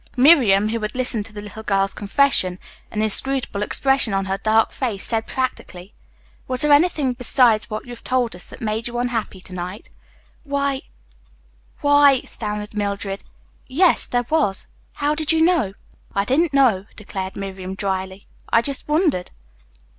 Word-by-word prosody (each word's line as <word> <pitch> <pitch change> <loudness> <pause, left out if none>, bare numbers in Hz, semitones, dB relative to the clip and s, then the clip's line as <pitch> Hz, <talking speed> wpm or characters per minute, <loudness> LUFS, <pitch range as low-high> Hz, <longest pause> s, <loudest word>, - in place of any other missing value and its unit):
Miriam, 245 -8 +5
who 230 +1 -2
had 215 +1 -4
listened 245 -5 +2
to - - -15
the 205 -1 -8
little 210 +1 -9
girl's 195 -2 0
confession, 200 -4 +1 0.3
an 215 0 -2
inscrutable 245 0 +1
expression 270 0 +2
on 195 0 0
her 195 0 -2
dark 220 +1 +2
face, 225 -7 -2
said 225 -1 -1
practically, 205 -7 -4 0.5
"Was 255 +1 -1
there 300 -1 +4
anything 290 -4 +3
besides 240 -4 +2
what 215 0 -5
you 245 - -10
have 240 - -10
told 250 -5 0
us 180 - -7
that - - -12
made 220 0 -2
you 240 0 -5
unhappy 235 -6 -2
to 185 - -12
night?" 180 +3 -7 0.5
"Why 280 -2 -1 1.0
why," 285 -2 +5
stammered 210 -1 -5
Mildred. 200 -1 -3 0.4
"Yes, 330 +7 +3
there 245 0 0
was. 290 -12 0 0.3
How 290 0 0
did 310 0 -1
you 325 - +2
know?" 320 - +2 0.4
"I 200 0 +1
didn't 300 +8 +2
know," 240 -9 +3
declared 190 -2 -6
Miriam 190 -1 -6
dryly. 190 -1 -3 0.2
"I 230 - +3
just 280 0 -2
wondered." 300 - +1
225 Hz, 160 wpm, -21 LUFS, 200-270 Hz, 1.0 s, Miriam